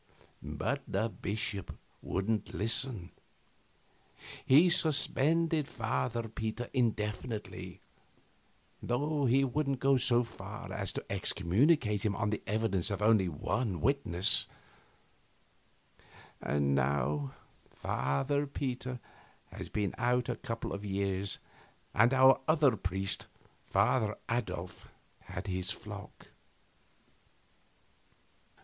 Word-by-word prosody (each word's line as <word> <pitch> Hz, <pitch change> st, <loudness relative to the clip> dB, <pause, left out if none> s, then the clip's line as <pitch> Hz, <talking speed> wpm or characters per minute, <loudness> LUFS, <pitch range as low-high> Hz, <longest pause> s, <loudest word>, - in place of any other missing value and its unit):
But -, -, -2 dB
the 110 Hz, +4 st, 0 dB
bishop 100 Hz, -3 st, -3 dB, 0.2 s
wouldn't 105 Hz, +3 st, -2 dB
listen. 110 Hz, -3 st, +1 dB, 1.3 s
He 150 Hz, +7 st, +6 dB
suspended 160 Hz, -2 st, +2 dB
Father 115 Hz, 0 st, -2 dB
Peter 110 Hz, +2 st, -4 dB
indefinitely, 110 Hz, -2 st, -2 dB, 1.0 s
though 145 Hz, +4 st, 0 dB
he 130 Hz, +3 st, +4 dB
wouldn't 135 Hz, 0 st, 0 dB
go 135 Hz, +1 st, +4 dB
so 120 Hz, -1 st, +4 dB
far 120 Hz, -, -8 dB
as -, -, -3 dB
to -, -, -5 dB
excommunicate 105 Hz, -, +2 dB
him 105 Hz, -2 st, 0 dB
on 105 Hz, -1 st, -1 dB
the 105 Hz, -, -2 dB
evidence 105 Hz, -4 st, +1 dB
of 100 Hz, 0 st, -2 dB
only 105 Hz, -4 st, +4 dB
one 95 Hz, -, -2 dB
witness; 115 Hz, -10 st, +3 dB, 1.9 s
and 70 Hz, -1 st, +1 dB
now 70 Hz, +1 st, 0 dB, 0.3 s
Father 135 Hz, -, -1 dB
Peter 130 Hz, -2 st, -4 dB, 0.5 s
had -, -, -8 dB
been 105 Hz, -2 st, -1 dB
out 125 Hz, 0 st, +1 dB
a -, -, -1 dB
couple 115 Hz, 0 st, -5 dB
of 100 Hz, +1 st, -5 dB
years, 100 Hz, -1 st, -1 dB, 0.6 s
and 115 Hz, +4 st, +5 dB
our 135 Hz, 0 st, +6 dB
other 155 Hz, -6 st, +4 dB
priest, 95 Hz, 0 st, 0 dB, 0.4 s
Father 105 Hz, +1 st, +2 dB
Adolf, 95 Hz, -7 st, -3 dB, 0.4 s
had 90 Hz, -, -6 dB
his 95 Hz, -2 st, -2 dB
flock. 100 Hz, -1 st, -8 dB
110 Hz, 100 wpm, -32 LUFS, 95-130 Hz, 1.9 s, He